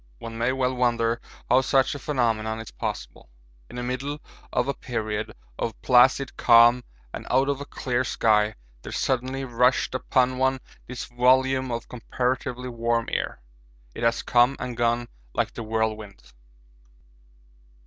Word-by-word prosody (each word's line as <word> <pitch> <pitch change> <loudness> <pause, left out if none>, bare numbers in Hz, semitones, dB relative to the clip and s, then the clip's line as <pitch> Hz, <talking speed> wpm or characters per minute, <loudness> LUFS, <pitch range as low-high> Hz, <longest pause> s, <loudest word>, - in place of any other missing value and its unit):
One 115 - -8
may 115 +2 +1
well 130 -1 0
wonder 120 -2 +1 0.3
how 125 +2 +5
such 135 0 +2
a 145 - -6
phenomenon 115 -6 -1
is 115 - -8
possible. - - -6 0.4
In - - -11
the 125 - -4
middle 135 +4 -3 0.3
of 125 - 0
a 140 - 0
period 110 -5 -4 0.3
of 115 - -3
placid 130 +2 +4
calm 120 +1 +6 0.3
and - - -7
out 135 +2 +3
of 140 -1 -1
a 140 - -7
clear 125 -1 -1
sky 105 -3 +2 0.3
there - - -8
suddenly 130 +1 -1
rushed 125 +1 +2
upon 130 0 +1
one 130 0 +2 0.3
this 125 -1 -6
volume 130 +1 +2
of 115 0 -4
comparatively 125 +1 -3
warm 115 -1 -1
air; - - -3 0.5
it - - -8
has 115 0 +1
come 120 +2 +4
and 125 -1 -4
gone 120 0 0 0.3
like - - -1
the - - -6
whirlwind. 110 -2 -3
125 Hz, 150 wpm, -25 LUFS, 115-130 Hz, 0.5 s, calm